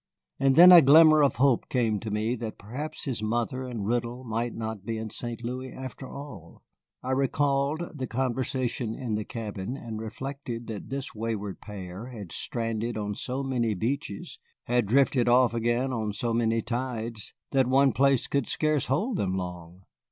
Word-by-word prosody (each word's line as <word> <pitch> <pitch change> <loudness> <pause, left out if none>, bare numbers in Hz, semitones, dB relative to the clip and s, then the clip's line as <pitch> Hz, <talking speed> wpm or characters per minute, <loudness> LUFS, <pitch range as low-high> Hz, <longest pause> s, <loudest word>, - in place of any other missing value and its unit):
And 135 -1 +3
then 180 +3 +10
a 175 -2 +11
glimmer 155 +2 +7
of 140 - +3
hope 135 -2 +2
came 115 -5 +1
to 110 - -5
me 105 +3 0
that 115 -1 -5
perhaps 130 +10 -6
his 130 -6 -3
mother 120 +4 -1
and 115 -5 -4
Riddle 120 +2 -1
might 115 0 -2
not 110 -3 -5
be 115 +2 -3
in 110 -1 -5
St. 120 +1 -6
Louis 130 +2 -4
after 130 0 -8
all. 140 - -10 0.4
I 130 - -2
recalled 140 +4 0
the 130 - -2
conversation 125 -1 -1
in 125 -5 -4
the 105 0 -1
cabin, 110 +2 -5
and 110 -4 -6
reflected 120 +1 -6
that 110 -3 -7
this 135 0 -4
wayward 105 -3 -4
pair 100 +1 -8
had 105 -9 -9
stranded 115 -1 -2
on 105 -1 -2
so 130 +6 -3
many 120 -5 0
beaches, 115 0 -3 0.2
had 120 -3 +1
drifted 130 0 +3
off 125 0 +5
again 120 +3 0
on 110 -3 -2
so 115 +2 -1
many 115 -1 +1
tides, 120 -3 -4 0.2
that 135 -2 +3
one 135 +1 +4
place 135 +2 +3
could 140 -3 -1
scarce 155 -3 0
hold 200 - 0
them 95 -1 0
long. 90 0 -6
120 Hz, 175 wpm, -27 LUFS, 110-135 Hz, 0.4 s, a